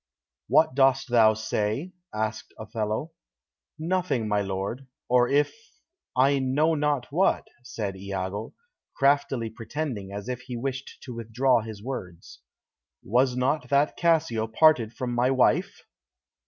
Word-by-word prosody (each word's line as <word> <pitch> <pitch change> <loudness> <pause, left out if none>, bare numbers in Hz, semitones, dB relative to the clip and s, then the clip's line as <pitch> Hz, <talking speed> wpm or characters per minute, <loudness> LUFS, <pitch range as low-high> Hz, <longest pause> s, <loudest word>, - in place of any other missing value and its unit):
"What 160 -3 +4
dost 135 0 +3
thou 110 -2 +5
say?" 110 - -2 0.2
asked 110 0 -4
Othello. 110 +7 -3 0.7
"Nothing, 165 -8 -1
my 105 -1 +1
lord; 100 +7 -4 0.2
or 125 0 +4
if 145 +1 +2 0.6
I 135 +2 +4
know 140 +5 +2
not 145 -4 0
what," 180 +6 +2
said 105 -5 -5
Iago, 95 +2 -5 0.4
craftily 135 -4 +1
pretending 115 -4 -5
as 100 +2 -6
if 125 -1 -3
he 125 -1 -6
wished 135 +2 -5
to 125 - -7
withdraw 120 +2 +1
his 110 -2 -9
words. 95 -10 -7 0.6
"Was 125 +4 +2
not 135 +4 0
that 140 +1 +2
Cassio 160 -10 +1
parted 120 -2 +4
from 125 -1 -4
my 120 +1 +2
wife?" 130 -1 +2
125 Hz, 125 wpm, -26 LUFS, 110-140 Hz, 0.7 s, thou